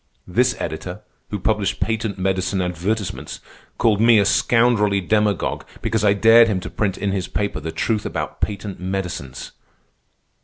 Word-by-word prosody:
This - - +2
editor, - - -5 0.3
who 105 - -3
published 105 +1 0
patent 110 -2 -2
medicine 95 +1 0
advertisements, 90 +4 -3 0.4
called 105 -2 +2
me 115 0 +6
a 100 - +4
scoundrelly 105 -1 +3
demagogue 105 0 0 0.2
because 110 -2 0
I 100 -1 +5
dared 115 +3 +6
him 100 -4 0
to - - -7
print 100 -3 -1
in 100 - -1
his 95 -2 -2
paper 100 -1 -2
the 80 +2 -5
truth 105 +6 -1
about 75 -1 -5
patent 100 -1 -3
medicines. 90 -8 -5
100 Hz, 150 wpm, -21 LUFS, 95-110 Hz, 0.4 s, me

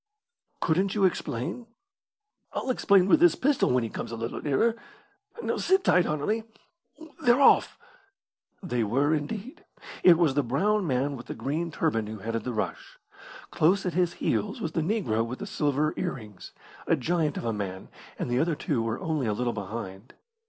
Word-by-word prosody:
"Couldn't 190 +5 +1
you 200 -2 +3
explain?" 180 - -2 0.9
"I'll 260 - -1
explain 200 -6 +4
with 310 - +5
this 345 0 +5
pistol 285 +1 +2
when 125 -1 +2
he 115 - -3
comes - - -5
a - - -4
little 115 +1 -4
nearer. 155 +11 +2 0.7
Now - - -1
sit 380 0 +2
tight, 180 -1 +4
Anerley. 155 +10 -1 0.8
They're 245 +1 +4
off!" 275 - +5 0.9
They 125 -10 -1
were 135 +8 +1
indeed. 195 - -4 0.4
It 175 -2 +7
was 165 -5 +3
the 145 - +2
brown 185 - +1
man 135 +1 0
with 120 -2 -10
the - - -5
green 145 +9 -2
turban 130 -10 0
who 110 +1 -6
headed 115 +2 -4
the 125 - -2
rush. 105 -5 -4 0.5
Close 190 +5 +2
at 180 - -1
his 175 0 +1
heels 110 -3 -1
was 165 - -3
the 165 - -1
negro 155 - 0
with 120 +3 -5
the - - -6
silver 150 +1 0
ear 180 - -2
rings 105 -7 -11 0.4
a - - +4
giant 160 +1 0
of - - -4
a 115 - 0
man, 95 -3 -5 0.3
and - - -3
the 120 +1 0
other 165 +1 +1
two 120 - -1
were 115 0 -2
only 155 -8 -1
a 105 - +1
little 120 +2 -1
behind. 100 0 -7
145 Hz, 180 wpm, -27 LUFS, 115-180 Hz, 0.9 s, It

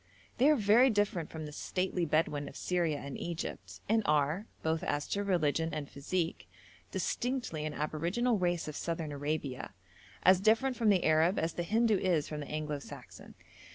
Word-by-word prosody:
They 270 +4 +6
are 305 - +6
very 230 +3 +5
different 205 -7 0
from 160 -1 -6
the 150 - -7
stately 180 +3 -1
Bedouin 150 -2 0
of - - -14
Syria 170 -4 0
and 140 -1 -7
Egypt, 170 -1 -5
and 225 +1 +3
are, 150 +7 +1 0.2
both 160 0 0
as 145 -5 -1
to 205 - -1
religion 165 -4 +1
and 150 -2 -4
physique, 165 +4 -3 0.4
distinctly 245 - -2
an 150 - -5
aboriginal 175 +10 0
race 175 -2 0
of 150 - -5
Southern 165 -2 -3
Arabia, 145 -7 -3 0.5
as 185 0 +6
different 225 +5 +3
from 230 -3 +2
the 190 -3 +4
Arab 160 +4 +3
as 165 0 0
the - - -3
Hindoo 220 +3 +2
is 170 -6 +1
from 150 - -5
the 145 - -6
Anglo 150 -1 -3
Saxon. - - -12
165 Hz, 175 wpm, -32 LUFS, 150-200 Hz, 0.5 s, They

